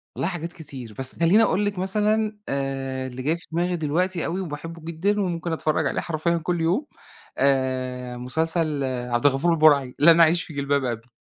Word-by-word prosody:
والله - - -1
حاجات 170 -2 -5
كتير، 130 -9 -10
بس 130 0 -1
خليني 180 +7 +5
أقول 205 -1 +1
لِك 205 -2 -2
مثلًا 210 +3 0
آآ، 135 -1 -3
اللي 130 0 -7
جاي 155 +5 +1
في 170 - -17
دماغي 175 +2 0
دلوقتي 170 +3 -1
و 170 - -2
وباحبه 165 +1 -7
جدًا 190 +6 0
وممكن 170 -3 -2
أتفرج 155 -1 0
عليه - - -1
حرفيًا 170 +1 -1
كل 170 +1 -2
يوم، 180 - +1 0.5
آآ، 130 -2 0
مسلسل 155 +3 -1
عبد 125 -1 -2
الغفور 145 +5 +3
البرعي، 145 -5 +4
لن 165 +2 +7
أعيش 165 +1 +5
في 160 - -11
جلباب 140 -1 0
أبي. 120 0 -4
160 Hz, 175 wpm, -24 LUFS, 135-175 Hz, 0.5 s, لن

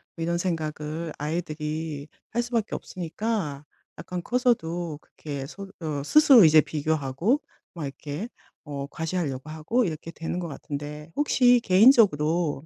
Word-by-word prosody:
뭐 165 - -8
이런 170 +1 0
생각을 160 -2 -3
아이들이 155 -1 -3 0.2
할 240 +1 0
수밖에 235 -3 -1
없으니까 175 -4 -4 0.3
약간 180 -1 -5
커서도 175 -11 0
그렇게 140 -3 -7
스 195 +6 -9 0.2
어 150 -3 -3
스스로 275 - +7
이제 155 0 +7
비교하고 155 - 0 0.3
막 165 -4 -5
이렇게 145 +7 -5 0.4
어 140 -2 -4
과시하려고 155 -4 -3
하고 165 +11 0
이렇게 165 -1 -5
되는 165 +2 -4
것 175 - -4
같은데 150 +1 -7
혹시 245 -4 +4
개인적으로 175 - +4
160 Hz, 310 characters per minute, -26 LUFS, 150-185 Hz, 0.4 s, 스스로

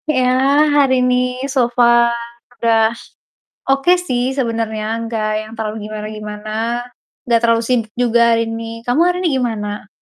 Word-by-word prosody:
Ya, 260 -4 +2 0.5
hari 275 -3 +4
ini, 250 +1 0
so 260 -3 +1
far 235 -1 +5 0.5
udah 225 -1 +3 0.8
oke 275 +5 +3
sih 255 -9 -2
sebenernya, 225 -4 -2 0.2
gak 220 -2 -2
yang 215 0 -11
terlalu 215 -1 -3
gimana-gimana, 215 0 -7 0.8
gak 230 -1 +4
terlalu 230 -1 +3
sibuk 230 -3 0
juga 240 -1 +2
hari 230 0 +2
ini. 225 0 -5 0.2
Kamu 245 +6 +2
hari 360 - -1
ini - - +3
gimana? 210 -3 -4
235 Hz, 140 wpm, -17 LUFS, 220-250 Hz, 0.8 s, far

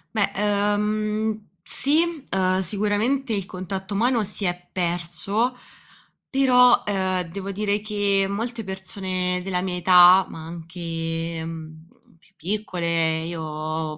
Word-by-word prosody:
Beh, 205 -2 +2
ehm, 210 +1 0
sì, 290 - +4 0.3
uhm, 185 0 +2
sicuramente 215 +7 0
il 200 -3 -2
contatto 190 +2 -6
umano 235 +2 +2
si 200 0 -1
è 180 0 -3
perso, 175 +6 -1 0.8
però, 250 -2 +5
ehm, 190 -2 0
devo 195 +3 -5
dire 205 +1 -1
che, 205 -2 +1
molte 230 +3 -4
persone 185 -1 -3
della 180 -1 -1
mia 185 -1 -3
età, 180 +1 +7
ma 160 -1 -9
anche, 165 -1 -5
uhm, 160 0 -9 0.3
più 195 - -26
piccole, 170 -4 -1
io, 155 -1 -4
190 Hz, 115 wpm, -23 LUFS, 170-210 Hz, 0.8 s, età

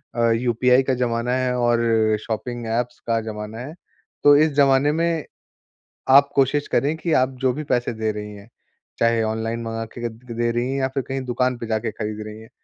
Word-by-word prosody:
अ, 115 -1 +2
UPI 125 +2 +3
का 130 0 0
ज़माना 120 -1 -1
है 130 -1 0
और 120 -1 +2 0.4
शॉपिंग 120 +2 -4
एप्स 120 +2 -2
का 115 -1 +2
ज़माना 105 0 -6
है, 135 +5 -7 0.5
तो 145 0 +8
इस 155 +1 +4
ज़माने 140 0 +4
में 165 0 0 0.8
आप 140 +2 +7
कोशिश 140 +2 +2
करें 145 +3 +1
कि 165 +1 -3
आप 130 -2 +3
जो 130 -1 +3
भी 150 +4 -5
पैसे 120 -1 +1
दे 110 0 -1
रहीं 105 0 -7
हैं, 100 +1 -13 0.5
चाहे 115 0 +3
ऑनलाइन 110 +1 -2
मँगा 115 0 -4
के 115 +2 -11
क - - -12
द 120 +2 -14
दे 120 0 +1
रहीं 120 +2 -1
हैं, 135 - -1
या 130 - +2
फिर 135 0 -3
कहीं 135 0 -3
दुकान 125 0 0
पे 120 - -6
जाके 110 +1 -1
खरीद 105 -1 -5
रहीं 110 +1 -9
हैं, 110 - -14
120 Hz, 210 wpm, -22 LUFS, 115-135 Hz, 0.8 s, तो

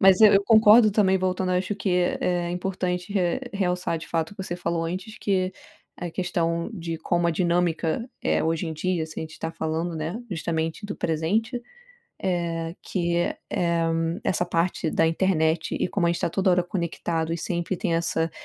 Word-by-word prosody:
Mas 190 +1 +6
eu 215 -1 +9
eu 195 - +5
concordo 220 0 +7
também 195 -2 +3
voltando, 185 0 0
eu 180 - +3
acho 190 +2 -2
que 205 - -1
é 180 0 +2 0.3
é - - -3
importante 180 +1 -2
re 180 +3 +1
realçar 180 -4 0
de 160 - -9
fato 165 +4 -1
que 195 - -5
você 175 -2 -4
falou 170 -1 -1
antes 185 +6 -5
que 185 -2 0 0.4
a 175 -1 -5
questão 170 -2 -1
de 165 -4 -4
como 175 +1 +1
a - - +3
dinâmica 175 +4 0
é - - +2
hoje 165 +1 0
em 160 - -3
dia, 170 0 -1
se 155 - -8
a - - -2
gente 160 0 -9
tá 160 - -4
falando, 165 +1 -2
né, 165 +9 -3
justamente 165 +1 -2
do 205 - -5
presente, 215 - 0 0.6
eh, 170 -2 -1
que 170 -2 -1
é 175 - 0
eh, 170 -1 +1 0.4
essa 175 -1 +1
parte 170 -1 0
da 165 - +3
internet 160 -2 +1
e - - +1
como 175 -4 +1
a - - +3
gente 170 - -3
tá - - +1
toda 190 +2 +1
hora 180 0 +3
conectado 170 -3 -2
e - - -2
sempre 175 +2 -2
tem 170 -1 -1
essa 165 -1 0
175 Hz, 195 wpm, -25 LUFS, 165-190 Hz, 0.6 s, eu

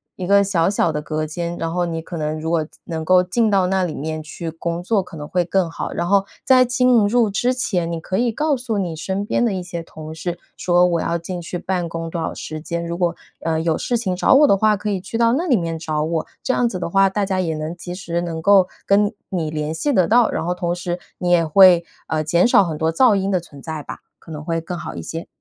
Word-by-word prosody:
一 180 - -5
个 200 +1 +5
小 190 -3 +1
小 185 -4 +1
的 150 -1 -3
隔 155 +1 -3
间， 170 +2 -4
然 165 0 -3
后 180 0 0
你 165 -1 -3
可 170 +1 -7
能 155 0 -2
如 160 +1 -3
果 165 -2 +1 0.2
能 160 -1 -4
够 180 +2 +4
进 215 +5 +1
到 195 -2 +3
那 190 0 +1
里 170 -3 -3
面 155 +2 -4
去 160 +2 -6
工 170 +1 -4
作 205 +2 +2
可 180 -2 -11
能 150 0 -7
会 180 +2 +1
更 180 0 0
好。 - - -5
然 170 - -2
后 195 +1 +3 0.2
在 255 -1 +6
进 250 -3 +3
入 230 0 +3
之 240 +6 +1
前， 180 -9 -1
你 165 - -3
可 185 +3 -3
以 240 0 +2
告 300 +5 +1
诉 240 -4 -3
你 175 -5 -2
身 190 +5 -3
边 225 - 0
的 230 -4 +1
一 185 -1 -3
些 175 -1 -5
同 155 -1 -9
事， 170 +2 -4 0.2
说： 175 0 +3
“我 170 -2 +1
要 170 - 0
进 175 +1 -6
去 175 +1 -5
办 180 -1 -2
公 165 0 -5
多 170 - -3
少 - - -2
时 155 0 -7
间， 170 +1 -4
如 170 0 -3
果， 175 -1 0 0.3
呃， 160 -1 0
有 165 -1 +1
事 240 - -1
情 195 -6 -2
找 180 - +3
我 290 +2 +7
的 200 - +5
话， 215 +1 +3
可 210 +2 -3
以 190 -2 -2
去 200 +5 -5
到 230 0 +3
那 330 +7 0
里 255 -7 +4
面 165 -2 -3
找 155 -1 -2
我。” 160 0 -2 0.2
这 255 - +1
样 245 -2 +2
子 190 - -4
的 175 - -3
话， 195 +1 +4
大 200 +1 -1
家 190 -1 -1
也 165 -3 -1
能 155 +2 -4
及 175 0 -7
时 170 -2 -3
能 170 -2 -4
够 195 +1 +5 0.2
跟 205 +2 +3 0.2
你 165 -5 -2
联 150 0 -3
系 290 - -1
得 185 -9 +3
到， 235 +1 +4
然 - - -2
后 175 - 0
同 175 -1 -2
时 175 0 -4 0.2
你 175 -1 -1
也 175 -1 +5
会， 175 +1 +7 0.2
呃， 155 -1 -1
减 170 +6 +3
少 205 - +5
很 160 -4 -3
多 160 +1 0
噪 225 +5 +5
音 195 0 0
的 185 - +2
存 160 -5 -13
在 160 -2 -5
吧。 - - -8 0.2
可 165 - -13
能 150 -1 -6
会 165 0 -1
更 175 +2 -5
好 175 - -7
一 - - -5
些。 165 +1 -6
175 Hz, 290 characters per minute, -20 LUFS, 165-200 Hz, 0.3 s, 我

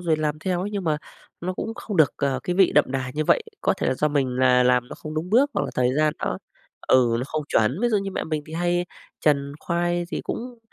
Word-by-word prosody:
rồi 165 -3 +1
làm 155 -1 -1
theo 180 +1 -1
ấy, 200 +3 -3
nhưng 200 -2 -3
mà 155 -2 +1 0.4
nó 180 +2 -2
cũng 225 +4 -4
không 210 -5 -5
được, 155 -4 +5
ờ, 135 -2 0
cái 180 0 -2
vị 190 -2 +5
đậm 150 - +6
đà 130 -1 -3
như 155 0 0
vậy. - - +3 0.2
Có - - +2
thể 130 - 0
do 150 +3 +1
mình 140 -3 +1
là 125 -1 +4
làm 125 0 +2
nó - - -7
không 155 0 -8
đúng 165 +4 -3
bước, 270 +6 +4
hoặc - - +1
là - - -4
thời 125 +1 +2
gian 155 -1 +3
nó - - -2 0.5
ừ, 125 -3 +4
nó - - -2
không 155 0 -3
chuẩn. 125 - +2
Ví 240 - +2
dụ 220 - +2
như 195 0 -4
mẹ - - -3
mình 155 -2 -2
thì 155 - -11
hay 175 +1 0 0.4
chần 140 -2 +2
khoai, 175 0 0
thì - - -2
cũng 245 0 -6
155 Hz, 265 wpm, -24 LUFS, 135-180 Hz, 0.5 s, đậm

